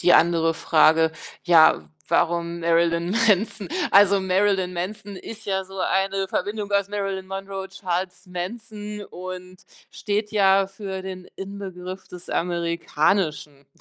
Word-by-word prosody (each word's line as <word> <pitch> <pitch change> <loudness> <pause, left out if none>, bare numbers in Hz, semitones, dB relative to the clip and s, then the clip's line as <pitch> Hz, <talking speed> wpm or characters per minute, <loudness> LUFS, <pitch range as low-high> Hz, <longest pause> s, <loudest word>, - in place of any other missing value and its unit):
Die 175 - +5
andere 165 -1 +4
Frage. 160 0 +4 0.3
Ja, 160 - +5 0.2
warum 170 0 +1
Marilyn 170 0 +2
Manson, 215 -2 +2 0.2
also 200 0 +6
Marilyn 190 0 +1
Manson 195 +3 -5
ist 215 +3 -9
ja 190 -1 0
so 195 +1 -10
eine 195 +1 0
Verbindung 205 +2 -3
aus 200 -1 +2
Marilyn 195 -2 -3
Monroe, 195 0 -5
Charles 185 -1 -4
Manson 210 +3 -6
und 185 0 -9 0.3
steht 210 0 -2
ja 195 -2 +4
für 195 -1 -6
den 185 -1 -8
Inbegriff 190 -1 -7
des 180 -1 -10
Amerikanischen. 170 -3 -1
190 Hz, 120 wpm, -24 LUFS, 175-200 Hz, 0.3 s, also